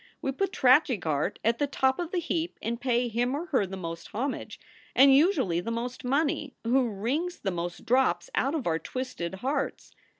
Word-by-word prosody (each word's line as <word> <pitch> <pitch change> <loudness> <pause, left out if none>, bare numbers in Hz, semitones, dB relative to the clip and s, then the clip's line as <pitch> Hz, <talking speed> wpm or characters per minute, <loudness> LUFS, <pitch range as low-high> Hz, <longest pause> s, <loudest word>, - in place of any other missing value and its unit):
We 270 - -2
put 390 +7 -1
tragic 255 - +4
art 155 +4 0
at 230 +1 +2
the 290 - +1
top 265 0 +1
of 345 -2 -2
the 365 - -2
heap 340 0 -2
and 235 +2 -3
pay 245 -1 +1
him 240 +3 0
or 320 +4 -3
her 260 - +1
the 190 +1 -6
most 165 -2 -6
homage, 260 +6 -4 0.4
and 270 +1 +7
usually 275 - +3
the 175 - -4
most 240 +2 -4
money, 285 +2 0
who 245 +1 +2
wrings 265 - -2
the 195 - -1
most 175 0 -5
drops 260 - +2
out 280 -7 +1
of 295 - -2
our 165 -1 +1
twisted 190 -9 -5
hearts. 280 +1 -2
255 Hz, 195 wpm, -28 LUFS, 210-285 Hz, 0.4 s, and